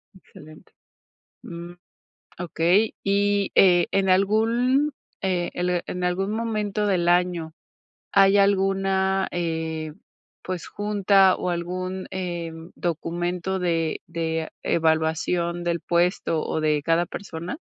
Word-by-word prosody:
Excelente. 155 -4 -16 0.7
Mm. 170 +1 -8 0.7
Okey, 175 +4 +2
y, 200 0 +1
eh, 175 -3 +5
¿en 195 -1 +2
algún, 230 +9 +2 0.3
eh, 180 -2 0
el 180 -1 0
en 180 0 -4
algún 190 +3 0
momento 215 -2 -1
del 180 -4 +1
año 175 -2 +1 0.6
hay 195 0 +5
alguna, 195 -1 +2
eh, 160 -2 -3 0.5
pues, 185 -2 -5
junta 200 -2 +3
o 180 - -2
algún, 185 +2 -4
eh, 175 -3 -4 0.2
documento 175 +2 -2
de 165 -3 -1
de 160 -1 -3
evaluación 165 +2 0
del 170 -1 -1
puesto, 170 -2 +1
o - - -1
de 150 -1 +1
cada 165 +3 +2
persona? 175 - -7
180 Hz, 110 wpm, -24 LUFS, 170-195 Hz, 0.7 s, eh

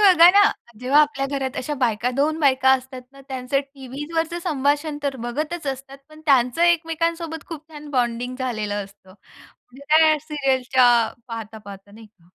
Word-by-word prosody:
बघा 360 -4 +8
ना, 405 +2 +6 0.4
जेव्हा 270 +4 +4
आपल्या 290 -2 +1
घरात 265 -1 -3
अशा 295 +3 -3
बायका 235 -1 0
2 305 +3 +1
बायका 265 -2 +4
असतात 260 0 -2
ना, 275 - -15
त्यांचं 260 +1 -1
टीव्हीवरच 295 +6 -4
संभाषण 290 -1 0
तर 275 -2 -2
बघतच 305 +6 -4
असतात 270 0 -6
पण 310 0 -15
त्यांचं 260 +3 +3
एकमेकांसोबत 330 -1 0
खूप 320 -1 -9
छान 300 0 -10
बॉन्डिंग 245 -1 -1
झालेलं 215 -5 -3
असतं. 195 -1 -19 0.6
त्या 310 +2 +4
सीरियलच्या 265 -4 +1 0.4
पाहता, 225 -1 -7
पाहता 200 -1 -12
नाही 220 0 -13
का. 205 -4 -31
275 Hz, 150 wpm, -22 LUFS, 250-310 Hz, 0.6 s, बघा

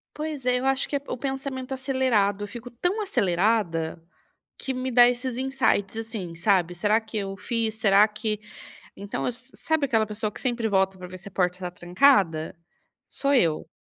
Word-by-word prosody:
Pois 300 -4 -5
é, 250 0 +2
eu - - -3
acho 270 0 +1
que 285 - -3
é 280 - 0
o - - -3
pensamento 270 0 -4
acelerado. 255 -7 +1
Eu - - -9
fico 240 +3 -9
tão 355 - -1
acelerada 180 - 0 0.6
que 265 - -3
me 255 0 -3
dá 245 0 +7
esses 250 0 -3
insights, 260 -6 0
assim, 220 -7 -5
sabe? 175 -1 +2
Será 210 +5 +2
que 220 0 -6
eu 195 -1 -3
fiz? 220 +2 -2
Será 210 -1 +5
que 215 0 -3 0.6
Então 200 +1 -5
eu - - 0
s 245 +2 -7
sabe 315 -2 +1
aquela 225 -3 +2
pessoa 210 0 -3
que - - -10
sempre 240 -3 0
volta 190 -1 +2
para 180 -1 -8
ver 185 - -8
se 195 - -12
a - - -26
porta 180 0 0
tá 180 - -4
trancada? 175 - +2 0.5
Sou 280 0 0
eu. 165 - +2
220 Hz, 190 wpm, -25 LUFS, 195-260 Hz, 0.6 s, dá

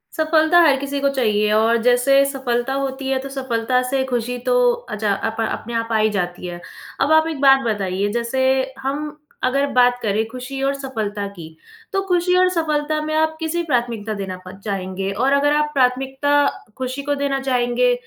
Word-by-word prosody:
सफलता 315 +1 +3
हर 285 -5 +5
किसी 280 0 -3
को 280 - +2
चाहिए 215 -5 +1
है 210 - +1
और 225 +2 +3
जैसे 250 +3 +4
सफलता 265 -2 -2
होती 270 0 -3
है 265 -1 +1
तो 275 - -7
सफलता 255 -2 -1
से 270 0 +1
खुशी 245 +1 -1
तो - - +3 0.2
अच्छा 215 - -2 0.2
अपा 225 0 -2
अपने 230 +1 -5
आप 230 0 -2
आ 220 - +3
ही 215 0 +3
जाती 180 -3 -3
है। 175 0 -7 0.4
अब 295 - +2
आप 315 0 +5
एक 295 -4 -5
बात 270 -1 +6
बताइए, 200 -2 -1
जैसे 240 +3 0 0.3
हम 290 +3 -4 0.3
अगर 275 +2 +1
बात 245 0 +3
करें 215 +1 0
खुशी 255 +3 -7
और 275 +1 +1
सफलता 220 -7 -4
की, 200 -4 -10 0.5
तो 390 - +1
खुशी 360 0 +2
और 370 0 +5
सफलता 310 -3 -1
में 310 - -3
आप 315 0 +1
किसी 325 +1 -1
प्राथमिकता 235 -7 -1
देना 195 -3 -5
प - - -7
चाहेंगे? 195 -1 -3
और 260 +7 +1
अगर 290 +1 +3
आप 300 0 +1
प्राथमिकता 265 +1 +1 0.5
खुशी 260 +1 -4
को 290 0 -1
देना 280 -1 -1
चाहेंगे, 255 - +1
260 Hz, 190 wpm, -20 LUFS, 225-285 Hz, 0.5 s, बात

